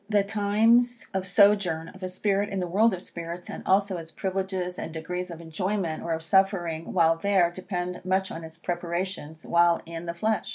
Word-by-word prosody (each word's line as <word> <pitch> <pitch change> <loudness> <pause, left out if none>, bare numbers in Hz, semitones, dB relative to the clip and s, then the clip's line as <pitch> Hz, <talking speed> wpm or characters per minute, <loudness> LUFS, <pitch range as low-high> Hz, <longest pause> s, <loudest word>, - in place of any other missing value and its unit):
The 205 -2 +3
times 220 +4 +3
of 190 0 -2
sojourn 180 -4 +3
of 190 - -14
a 185 - -3
spirit 200 +2 0
in 195 - -2
the 180 - -1
world 210 +6 +3
of 185 -1 -4
spirits, 170 +1 -7
and - - -6
also 195 0 +3
its 165 -1 -9
privileges 190 -1 -3
and - - -5
degrees 180 +3 -4
of 170 -1 -8
enjoyment, 170 +1 -2
or 170 - -4
of 160 0 -3
suffering, 175 -3 +1
while 165 -2 +4
there, 185 -1 +3
depend 180 -1 -4
much 190 +1 0
on 165 - -6
its 160 0 -10
preparations 175 -2 -4
while 170 0 +4
in 165 +1 -7
the 170 - -3
flesh. 215 +5 0
180 Hz, 195 wpm, -27 LUFS, 170-195 Hz, -, while